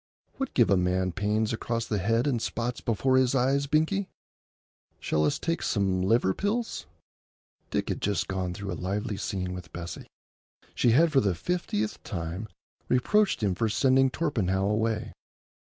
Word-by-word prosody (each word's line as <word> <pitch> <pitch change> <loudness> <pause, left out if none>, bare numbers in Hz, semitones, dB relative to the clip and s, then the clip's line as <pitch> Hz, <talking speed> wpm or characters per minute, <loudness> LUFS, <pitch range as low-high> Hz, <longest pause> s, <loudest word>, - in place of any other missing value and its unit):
What 270 -1 -4
give 120 -5 +4
a 100 - +5
man 90 +1 +1
pains 105 +4 0
across 115 0 -2
the 105 -2 -1
head 115 +6 +1
and 125 -6 0
spots 120 +1 -3
before 130 +4 +2
his 130 0 +3
eyes, 135 +2 +2
Binkie? 160 +7 +1 0.9
Shall 75 0 +1
us 75 - +1
take 165 0 -2
some 95 -3 +1
liver 95 0 +3
pills?" 220 - -2 0.8
Dick - - -1
had - - -2
just 100 0 0
gone 95 -2 -2
through 100 0 -5
a - - -2
lively 100 +5 -3
scene 95 -4 -3
with 90 -3 -8
Bessie. 85 0 -7 0.7
She 120 - +2
had 165 +5 +5
for 140 - +5
the 100 -4 +1
fiftieth 110 - -2
time 85 +4 -5 0.4
reproached 195 - +2
him 100 -3 +2
for 110 +5 0
sending 135 +3 +4
Torpenhow 105 - 0
away. 110 +1 -1
110 Hz, 160 wpm, -28 LUFS, 95-130 Hz, 0.9 s, a